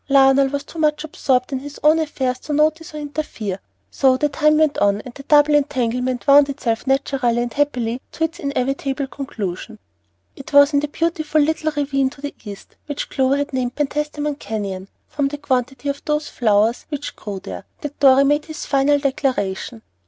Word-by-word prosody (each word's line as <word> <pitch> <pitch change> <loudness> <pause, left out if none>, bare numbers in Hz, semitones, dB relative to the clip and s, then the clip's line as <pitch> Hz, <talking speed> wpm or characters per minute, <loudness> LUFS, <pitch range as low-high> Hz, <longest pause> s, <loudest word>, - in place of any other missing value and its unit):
Lionel 270 0 +5
was 280 +1 -3
too 325 - -10
much 300 -1 +1
absorbed 265 -4 0
in 265 - -1
his 290 +2 -9
own 310 +2 +5
affairs 260 -5 -2
to 300 - -5
notice 310 +1 +1
or - - -4
interfere; 285 -10 -4 0.3
so 260 -2 +3
the 295 +3 +1
time 305 +1 +3
went 310 -2 +2
on, 200 0 +2
and 250 - -11
the 275 - -10
double 295 +1 +4
entanglement 255 -3 0
wound 285 0 +6
itself 250 -4 -2
naturally 270 -3 +1
and 240 0 -2
happily 255 -4 -1
to 325 - -2
its 325 +1 -2
inevitable 275 0 -2
conclusion. 225 -6 -6 0.6
It 275 - -11
was 285 +1 +7
in 285 - +4
the 295 - -2
beautiful 315 0 -1
little 310 +1 +1
ravine 275 -2 +1
to 275 +1 -15
the 285 0 -5
east, 205 -3 -10
which 290 -1 -4
Clover 265 0 +2
had 285 0 -3
named 255 -1 -2
"Penstamen 295 0 -2
Canyon," 195 -3 -4 0.2
from 285 -2 -1
the 290 +1 -5
quantity 260 -1 -2
of 280 0 -2
those 300 0 -1
flowers 220 0 +1
which 290 -2 -5
grew 205 -2 -6
there, 90 - -8 0.2
that 295 -1 -7
Dorry 275 -1 +6
made 295 +2 +2
his 315 -1 -7
final 280 +1 +3
declaration. 255 -6 -2
275 Hz, 185 wpm, -20 LUFS, 250-295 Hz, 0.6 s, was